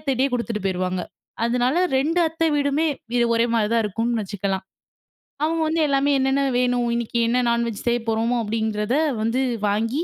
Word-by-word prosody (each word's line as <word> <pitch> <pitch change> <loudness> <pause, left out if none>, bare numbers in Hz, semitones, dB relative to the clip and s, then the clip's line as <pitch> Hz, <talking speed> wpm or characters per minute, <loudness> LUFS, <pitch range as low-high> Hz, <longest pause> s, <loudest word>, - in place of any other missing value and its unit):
அத்தைட்டயே 275 -2 0
குடுத்துட்டு 230 -4 -3
போயிருவாங்க. 185 0 -1 0.4
அதனால 250 +5 +1 0.2
2 325 +6 +1
அத்தை 325 +1 -1
வீடுமே 285 +2 +1 0.3
இது 240 - +3
ஒரே 230 +1 +3
மாரி 215 -2 +2
தான் 230 - +3
இருக்கும்னு 225 +3 -1
வச்சுக்கலாம். 195 -1 -3 0.8
அவங்க 325 +1 0
வந்து 320 +1 0
எல்லாமே 280 +1 +2
என்னென்ன 270 +1 +1 0.2
வேணும் 245 -1 +1
இன்னைக்கு 235 0 -2
என்ன 240 +2 +1
நான்வெஜ் 235 -2 -1
செய்ய 240 0 +2
போறோமோ 225 +2 +1
அப்டின்றறத 220 +1 -1 0.3
வந்து 230 +3 0 0.3
வாங்கி 230 +10 0
235 Hz, 155 wpm, -22 LUFS, 220-275 Hz, 0.8 s, இது